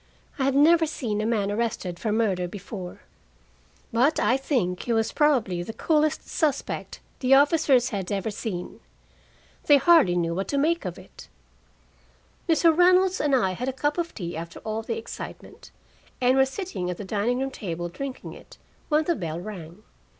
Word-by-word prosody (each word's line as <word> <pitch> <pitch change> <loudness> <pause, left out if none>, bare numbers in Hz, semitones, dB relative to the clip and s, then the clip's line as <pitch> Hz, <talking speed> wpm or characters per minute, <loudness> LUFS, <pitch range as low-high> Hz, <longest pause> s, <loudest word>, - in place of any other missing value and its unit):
I 265 - +1
had 275 0 +1
never 320 +3 +5
seen 220 -8 -3
a 215 - -1
man 205 -3 0
arrested 205 -5 -3
for 220 - -2
murder 200 -5 0
before, 190 -1 -8 0.9
but 260 +7 +3
I 250 - +3
think 245 - -1
he 235 - -1
was 225 0 +1
probably 245 - +1
the 200 +6 -6
coolest 310 +2 0
suspect 295 -4 -2 0.2
the 265 +1 +5
officers 280 -3 +4
had 195 -6 -4
ever 200 +2 -2
seen. 195 -4 -6 0.9
They 290 - +7
hardly 305 - +5
knew 170 -1 0
what 190 +3 -3
to 285 - -1
make 320 -1 +1
of 180 -2 -5
it. - - -14 1.2
Mr. 325 0 +4
Reynolds 365 +2 +4
and 290 -2 +2
I 190 -7 +2
had 250 +8 -3
a - - -3
cup 290 +5 -1
of 335 0 -3
tea 175 -4 -5
after 165 +1 -7
all 220 0 -3
the 225 - -4
excitement, 455 - -9 0.5
and 255 +1 +3
were 265 0 +4
sitting 270 - -4
at 180 - -4
the 205 - -7
dining 215 +5 0
room 270 +1 -2
table 175 -7 -5
drinking 265 +9 -7
it, - - -15 0.3
when 305 0 +3
the 345 - +1
bell 165 - -4
rang. 180 -1 -9
235 Hz, 175 wpm, -25 LUFS, 190-290 Hz, 1.2 s, They